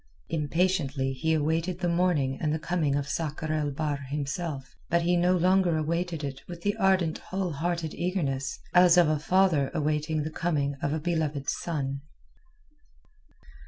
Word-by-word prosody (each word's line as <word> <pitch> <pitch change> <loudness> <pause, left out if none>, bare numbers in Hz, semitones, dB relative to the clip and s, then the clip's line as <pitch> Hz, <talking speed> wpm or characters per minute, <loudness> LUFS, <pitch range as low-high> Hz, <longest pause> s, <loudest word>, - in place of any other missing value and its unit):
Impatiently 150 -4 0
he 160 +5 0
awaited 160 +4 0
the 180 -1 -1
morning 170 -6 +1
and 155 -2 +1
the 155 - 0
coming 160 -3 0
of 140 -1 -1
Sakr 155 +1 -2
el 150 -2 0
Bahr 145 0 -2
himself, 140 +1 -4
but 170 0 +2
he 175 +1 +2
no 180 +1 +3
longer 180 -1 +3
awaited 165 +1 -2
it 135 -1 -5
with 170 -1 -9
the 205 +1 +1
ardent 190 -5 +2
whole 185 -2 -3
hearted 170 +1 -2
eagerness 145 -7 -2 0.2
as 180 -1 +6
of 175 -2 +6
a 155 -1 +1
father 165 -4 +3
awaiting 155 0 0
the 155 - -4
coming 150 -4 0
of 145 - 0
a 155 - -1
beloved 155 -4 -1
son. 140 -5 -3
160 Hz, 160 wpm, -28 LUFS, 145-175 Hz, 0.2 s, as